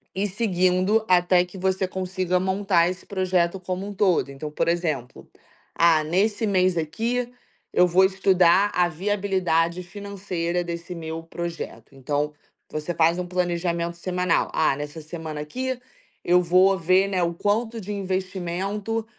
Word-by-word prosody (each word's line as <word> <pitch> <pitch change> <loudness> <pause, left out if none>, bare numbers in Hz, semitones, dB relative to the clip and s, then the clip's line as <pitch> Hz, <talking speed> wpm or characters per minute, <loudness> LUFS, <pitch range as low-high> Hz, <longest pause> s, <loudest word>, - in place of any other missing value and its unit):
ir 200 +2 0
seguindo 190 0 +1
até 180 0 +4
que 180 +2 -12
você 190 0 0
consiga 185 -1 -1
montar 190 -2 +2
esse 180 0 -7
projeto 185 -2 0
como 185 +2 -4
um 205 - -6
todo. 185 -7 +2
Então, 150 +2 -7
por - - -1
exemplo: 160 -8 -2 0.5
"Ah, 165 -2 +4
nesse 200 +8 +1
mês 185 -3 +2
aqui 230 +10 -1 0.4
eu 180 - +5
vou 185 +2 +5
estudar 190 0 +4
a 180 -1 +3
viabilidade 180 -2 0
financeira 180 -3 -3
desse 170 +1 -6
meu 165 0 -6
projeto". 170 -4 -7
Então, 145 +3 -1 0.4
você 155 +3 -3
faz 165 +1 +3
um 180 - -2
planejamento 170 -1 -1
semanal. 180 +1 0
"Ah, 155 -3 +2
nessa 145 +3 -6
semana 155 -1 -6
aqui 255 +11 -4 0.4
eu 180 +1 +4
vou 185 +3 +4
ver, 185 +3 +3
né, 190 -2 0
o 170 0 0
quanto 220 +6 -1
de 200 - -6
investimento 195 +3 -3
180 Hz, 145 wpm, -24 LUFS, 170-195 Hz, 0.5 s, eu